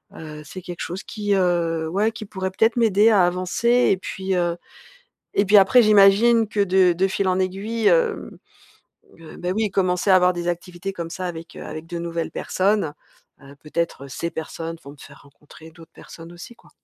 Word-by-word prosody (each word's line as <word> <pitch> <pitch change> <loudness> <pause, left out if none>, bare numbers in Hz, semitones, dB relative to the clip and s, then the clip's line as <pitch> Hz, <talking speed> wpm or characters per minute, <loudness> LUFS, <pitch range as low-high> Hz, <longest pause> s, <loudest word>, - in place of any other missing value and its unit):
Heu, 150 -1 -9
c'est 185 +5 -9
quelque 175 -1 -8
chose 180 +3 -5
qui, 205 -1 -3
heu, 170 -4 0
ouais, 205 +6 0
qui 220 -1 -9
pourrait 190 -1 -5
peut-être 220 +4 +2
m'aider 220 -1 +4
à 200 -5 +4
avancer 180 +6 -1 0.2
et 190 - +2
puis, 190 0 -4
heu, 175 -1 0 0.8
et 200 - +5
puis, 205 +1 +5
après, 200 +6 +6
j'imagine 215 +2 +5
que, 210 -1 -1
de 185 -2 +3
de 185 +3 +1
fil 195 0 -2
en 185 0 +1
aiguille, 200 +5 -2
hem, 480 -3 +1 0.8
heu, 165 - -12
bah, 180 - -4
oui, 215 0 0
commencer 185 0 0
à 185 - +7
avoir 180 0 +4
des 175 -1 -4
activités 175 +2 -5
comme 170 -3 -6
ça 185 +2 -5
avec, 165 -2 -8
heu, - - -8
avec 155 +1 -8
de 170 0 -6
nouvelles 170 -1 -4
personnes. 195 -4 0 0.5
Heu, 140 0 -14
peut-être 155 -3 -4
ces 170 +5 -4
personnes 165 +1 -6
vont 140 - -11
me 145 - -17
faire 140 +1 -15
rencontrer 150 +3 -17
d'autres 165 0 -17
personnes 165 +1 -13
aussi, 175 +8 -11
quoi. - - -23
185 Hz, 195 wpm, -22 LUFS, 170-200 Hz, 0.8 s, à